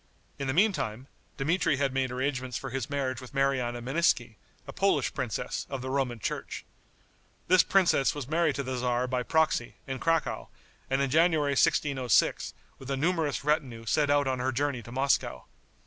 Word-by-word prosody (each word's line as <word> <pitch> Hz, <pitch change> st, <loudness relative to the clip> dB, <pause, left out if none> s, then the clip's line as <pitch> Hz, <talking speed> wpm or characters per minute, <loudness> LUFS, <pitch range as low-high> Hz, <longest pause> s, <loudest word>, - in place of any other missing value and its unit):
In 140 Hz, -, -3 dB
the 130 Hz, -, 0 dB
meantime, 170 Hz, -, +1 dB, 0.3 s
Dmitri 165 Hz, +1 st, +1 dB
had 135 Hz, -1 st, 0 dB
made 135 Hz, -1 st, 0 dB
arrangements 130 Hz, -1 st, -2 dB
for 135 Hz, -, -6 dB
his 130 Hz, -1 st, -3 dB
marriage 130 Hz, -3 st, -2 dB
with 130 Hz, +2 st, -12 dB
Mariana 130 Hz, -3 st, 0 dB
Meneiski, 125 Hz, -4 st, +1 dB, 0.3 s
a -, -, -8 dB
Polish -, -, +1 dB
princess, -, -, -3 dB
of 135 Hz, -2 st, -5 dB
the 130 Hz, -, -4 dB
Roman 130 Hz, -3 st, -1 dB
church. 110 Hz, -, -5 dB, 0.8 s
This 185 Hz, -1 st, +6 dB
princess 175 Hz, -9 st, +3 dB
was 145 Hz, -4 st, -5 dB
married 160 Hz, -1 st, +1 dB
to 140 Hz, -, -2 dB
the 130 Hz, -1 st, -3 dB
tzar 125 Hz, 0 st, 0 dB
by 125 Hz, 0 st, -1 dB
proxy, 155 Hz, -2 st, +1 dB
in 135 Hz, -1 st, -4 dB
Cracow, 165 Hz, -1 st, 0 dB, 0.4 s
and 135 Hz, +1 st, +1 dB
in 135 Hz, -, -1 dB
January, 160 Hz, -2 st, +3 dB
1606, 135 Hz, -2 st, +2 dB, 0.2 s
with 135 Hz, -, -10 dB
a 135 Hz, -, -1 dB
numerous 160 Hz, -2 st, 0 dB
retinue 140 Hz, -7 st, -1 dB
set 145 Hz, +6 st, +1 dB
out 145 Hz, 0 st, +3 dB
on 130 Hz, -1 st, -1 dB
her 130 Hz, +1 st, 0 dB
journey 135 Hz, 0 st, -1 dB
to 120 Hz, -, -12 dB
Moscow. 135 Hz, +2 st, 0 dB
135 Hz, 175 wpm, -28 LUFS, 125-150 Hz, 0.8 s, This